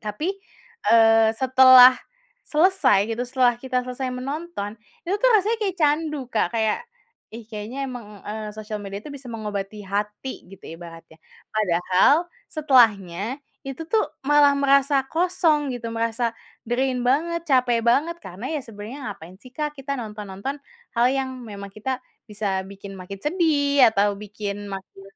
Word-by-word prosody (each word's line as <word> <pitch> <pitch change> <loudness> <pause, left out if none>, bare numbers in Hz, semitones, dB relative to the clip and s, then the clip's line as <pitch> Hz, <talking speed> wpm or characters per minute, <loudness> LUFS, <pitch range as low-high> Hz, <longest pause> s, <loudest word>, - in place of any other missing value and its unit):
tapi, 230 - -3 0.6
eee, 225 -1 +6
setelah 255 0 +8 0.5
selesai 315 - +3
gitu, 235 - -4
setelah 250 -1 +3
kita 255 -1 -1
selesai 255 +1 -4
menonton, 275 -4 -5 0.3
itu 365 - -1
tuh - - +4
rasanya 425 +3 +1
kayak 385 -3 -1
candu, 300 -2 +1
Kak. 195 -5 +1
Kayak, 220 - +1 0.6
"Ih, 230 - -8
kayaknya 225 +5 -5
emang," 210 -5 -9
eee, 215 0 -5
"sosial 215 0 -5
media 200 0 -6
itu 300 - -8
bisa 270 -2 -10
mengobati 210 -2 -5
hati." 210 +6 -4
Gitu 195 - -14 0.2
ibaratnya. 165 -1 -12 0.3
Padahal 190 - +3 0.3
setelahnya, 225 - +2 0.3
itu 275 +5 -6
tuh 445 - +4 0.2
malah 290 0 +5
merasa 280 0 +3
kosong 320 -5 +1
gitu, 230 -1 -6
merasa 230 +1 -1 0.3
drain 250 +1 0
banget, 325 +7 +1
capek 250 -3 +3
banget 295 +8 +2
karena 190 +8 -8
ya 300 - -1
sebenarnya 225 +4 -9
ngapain 180 +1 -13
sih, 255 - -14
Kak, 300 +2 -3
kita 275 +1 -5
nonton-nonton 210 +3 -6 0.4
hal 235 - +4
yang 270 -1 -1
memang 200 -3 -8
kita 255 +5 -4 0.2
bisa 200 -3 -3
bikin 195 0 -10
makin 190 +2 -8
sedih 295 -5 +3
atau 205 -1 +2
bikin 205 0 -6
makin 195 0 -9
245 Hz, 145 wpm, -23 LUFS, 205-280 Hz, 0.6 s, setelah